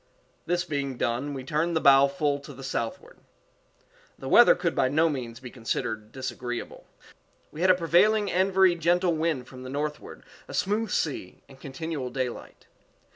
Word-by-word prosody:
This 175 +1 0
being 140 -5 -3
done, 125 +5 -2
we 130 - -6
turned 160 +5 -1
the - - +3
bow 140 -1 +6
full 140 +1 -1
to 145 +1 -11
the 135 - -10
southward. 120 -3 -5 1.0
The - - -8
weather - - +7
could - - -1
by 130 - +2
no 160 +4 +3
means 120 -5 -5
be 125 -2 -10
considered 115 -2 -4
disagreeable. 125 -1 -6 0.6
We 155 - -8
had 185 - +3
a 185 - +7
prevailing 195 +5 +3
and 190 +2 +2
very 190 -1 +5
gentle 175 +1 +1
wind 155 -5 -1
from 130 -1 -11
the 130 - -8
northward, 150 +2 -5 0.2
a - - -7
smooth 210 +2 0
sea, 140 - -3
and 135 -1 -16
continual 140 -1 -5
daylight. 130 -2 -5
145 Hz, 170 wpm, -26 LUFS, 130-170 Hz, 1.0 s, weather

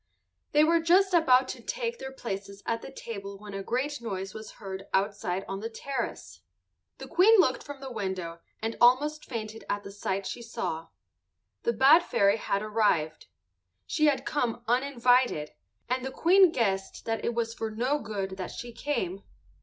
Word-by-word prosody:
They 300 +1 +5
were 335 +2 +4
just 365 +4 +4
about 260 -6 +5
to - - -6
take 475 -1 -3
their 265 - -6
places 200 -5 -6
at 230 0 -1
the - - -9
table 200 -6 -7
when 205 0 -10
a 195 - -3
great 260 +7 -2
noise 195 -4 -4
was 215 0 -9
heard 195 -1 -7
outside 195 -2 -1
on 195 0 -4
the 225 +2 -4
terrace. 245 +2 -5 0.6
The - - -8
Queen 420 +6 +6
looked 290 -9 +3
from 285 -2 -9
the 265 -1 -6
window 190 -6 -4 0.2
and 225 +1 -1
almost 290 +5 +4
fainted 220 -2 -6
at 205 0 -1
the 200 - -8
sight 195 -1 -3
she 240 - -5
saw. 225 -9 -4 0.7
The 470 - +1
bad 290 +6 +7
fairy 200 -8 +3
had 200 -1 -1
arrived. 210 -8 +1 0.6
She 305 - +1
had 285 -2 +1
come 245 -5 -1
uninvited, 245 - +2 0.4
and 255 +1 -1
the 265 - -2
Queen 360 +5 +5
guessed 195 -8 -1
that 225 -1 -2
it 235 - -1
was 230 -1 -1
for 225 -2 -3
no 250 +7 0
good 195 -5 -4
that 185 -2 -4
she 240 0 -8
came. 195 -8 -2
230 Hz, 175 wpm, -28 LUFS, 200-275 Hz, 0.7 s, bad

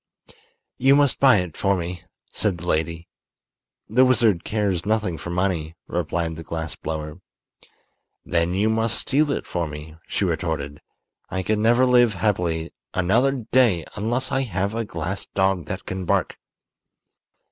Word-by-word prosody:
"You 135 +1 +5
must 145 -2 +3
buy 130 -5 +6
it 90 -4 -3
for 100 0 +1
me," 85 0 -5 0.3
said 100 -5 0
the 85 - -8
lady. 85 0 -1 0.8
"The 125 +5 +4
wizard 115 -8 +3
cares 100 -5 -1
nothing 105 -4 0
for 85 - -6
money," 85 -3 -1
replied 85 -1 -2
the 80 - -7
glass 80 -1 -4
blower. 75 +2 -5 1.0
"Then 85 +1 0
you 100 +3 +2
must 110 0 +1
steal 145 +2 +1
it - - -2
for 85 -2 -2
me," 75 +1 -9
she - - 0
retorted. 75 -3 -2 0.5
"I 95 0 -2
can 105 +2 0
never 120 +3 +4
live 120 -3 +4
happily 90 -5 -1 0.2
another 120 +8 +2
day 115 -10 +4
unless 120 +6 -1
I 135 - +1
have 100 -4 -2
a 115 0 -2
glass 85 +1 -4
dog 95 -4 +1
that 95 +4 -5
can 95 0 -4
bark." - - 0
95 Hz, 150 wpm, -23 LUFS, 85-115 Hz, 1.0 s, buy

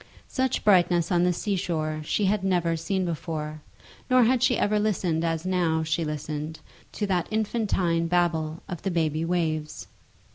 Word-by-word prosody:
Such 260 -1 -1
brightness 175 -3 +4
on 175 0 +3
the 180 - +3
sea 200 +3 -1
shore 155 -4 -2
she 200 +6 0
had 195 0 +1
never 175 -3 +1
seen 180 +3 -1
before, 155 -2 -4 0.5
nor 255 -1 +6
had 245 +1 +3
she 250 -2 +3
ever 210 0 +2
listened 180 -6 0
as 165 0 -1
now 170 -4 +1
she 160 +1 0
listened 150 +1 -4 0.3
to 210 - -2
that 185 -3 0
infantine 200 -6 0
babble 165 -2 0
of 175 -4 -6
the 195 - -1
baby 160 -3 0
waves. 160 -3 -2
175 Hz, 160 wpm, -26 LUFS, 160-195 Hz, 0.5 s, nor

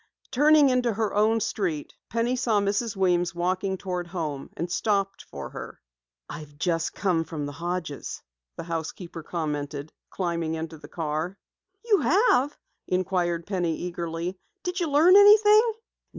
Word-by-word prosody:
Turning 295 +1 +5
into 250 -2 +2
her 215 0 -1
own 215 +2 +3
street, 175 -8 -2 0.2
Penny 230 +2 0
saw 230 -4 +2
Mrs. 205 +2 -1
Weems 175 -2 +1
walking 185 +2 -1
toward 180 -2 -4
home, 155 -6 -4
and 170 +1 -3
stopped 195 -1 0
for - - -8
her. - - -8 0.5
"I've 150 -1 -9
just 165 0 0
come 180 -5 +1
from 155 -3 -5
the 145 - -5
Hodges'," 165 -1 -5 0.3
the - - -6
housekeeper 165 +1 -5
commented, 150 -2 -4 0.2
climbing 170 -3 -2
into 160 0 -6
the 145 - -11
car. 160 +3 -3 0.5
"You 420 -4 +4
have?" 290 - +3 0.3
inquired 180 -2 0
Penny 175 -5 -1
eagerly. 175 +1 -4 0.2
"Did 360 0 -2
you 340 -3 0
learn 315 +6 +6
anything?" 420 +2 +7
180 Hz, 140 wpm, -26 LUFS, 165-230 Hz, 0.5 s, anything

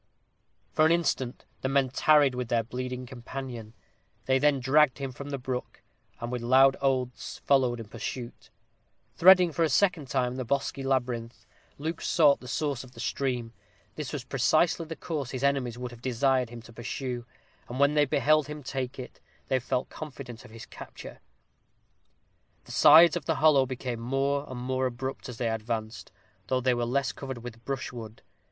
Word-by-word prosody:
For 155 - +3
an - - +2
instant 150 -7 0 0.2
the 130 - -1
men 135 -1 +2
tarried 145 +1 +4
with 125 -1 -3
their 115 -1 +1
bleeding 125 +2 -5
companion. 120 -2 -8 0.5
They 130 0 +3
then 145 -1 +3
dragged 140 +1 +4
him 135 -1 -4
from 140 +3 -8
the 140 - -3
brook, 125 -1 -5 0.4
and 120 +1 -5
with 125 -1 -3
loud 135 +3 +5
oaths 130 -2 -1
followed 130 -4 +3
in 115 - -6
pursuit. 120 +2 -7 0.7
Threading, 180 -1 +7
for 165 - -3
a 160 - +4
second 170 -1 +2
time, 125 -1 -1
the 130 - -2
bosky 135 +2 -1
labyrinth, 120 -3 -2 0.3
Luke 160 +3 -4
sought 150 -4 +4
the 125 - -11
source 140 0 -2
of 130 -1 -15
the 115 - -13
stream. 125 -2 -2 0.4
This 150 -4 -5
was 145 -4 -4
precisely 155 +6 +2
the 165 - -6
course 150 -7 -4
his 130 0 -5
enemies 135 -4 +1
would 125 0 -5
have 120 -1 -13
desired 130 0 +1
him 120 -1 -10
to 115 - -14
pursue; 120 +1 -5 0.4
and 125 +2 -5
when 140 +1 +4
they 150 -1 +4
beheld 155 +1 +2
him 150 -1 -7
take 130 -1 -4
it, 130 - -9 0.3
they 130 -1 +2
felt 125 0 -2
confident 135 -6 -8
of - - -13
his 115 0 -10
capture. - - -11 1.5
The - - -11
sides 160 +4 +8
of 170 -5 -3
the - - +1
hollow 145 -4 +4
became 125 -2 -4
more 135 +4 0
and 130 -1 -6
more 130 +1 0
abrupt 130 +2 -5
as 120 - -7
they 120 - -1
advanced, 110 0 -4 0.4
though 130 - +1
they 130 0 +2
were 120 0 -1
less 130 -1 0
covered 130 -4 -7
with 120 -1 -9
brushwood. 120 -5 -6
130 Hz, 180 wpm, -28 LUFS, 120-140 Hz, 1.5 s, sides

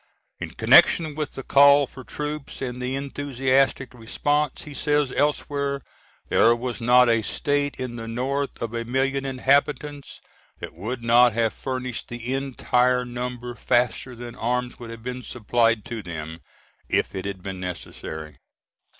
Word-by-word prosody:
In - - -6
connection 160 -4 +5
with 150 0 -4
the 135 - -7
call 140 +1 +6
for 130 0 -12
troops 150 +1 -5
and 125 -2 -4
the 125 +1 -2
enthusiastic 135 -1 0
response, 145 +6 -1
he 150 - -9
says 145 -2 +1
elsewhere, 140 -1 -1 0.4
"There 115 +1 +5
was 120 0 -4
not 125 +1 +6
a 115 -1 +3
State 145 +5 -1
in 125 -2 -4
the 115 0 -6
North 135 +5 -2
of 115 0 -4
a 115 0 -2
million 135 +3 0
inhabitants 140 +2 0 0.4
that - - -8
would 115 +8 -5
not 120 0 +5
have 115 -1 +1
furnished 130 -3 -4
the 120 +1 -4
entire 125 -2 +1
number 125 0 -5
faster 125 +1 0
than 120 0 -8
arms 125 +1 -2
would 120 -1 -8
have 115 -1 -9
been 125 +1 -5
supplied 115 -2 +1
to 115 -2 -5
them, 80 -3 -7 0.5
if - - +1
it 95 0 -5
had 100 -2 -5
been 95 -2 -5
necessary." 80 -4 -7
125 Hz, 150 wpm, -24 LUFS, 115-140 Hz, 0.5 s, call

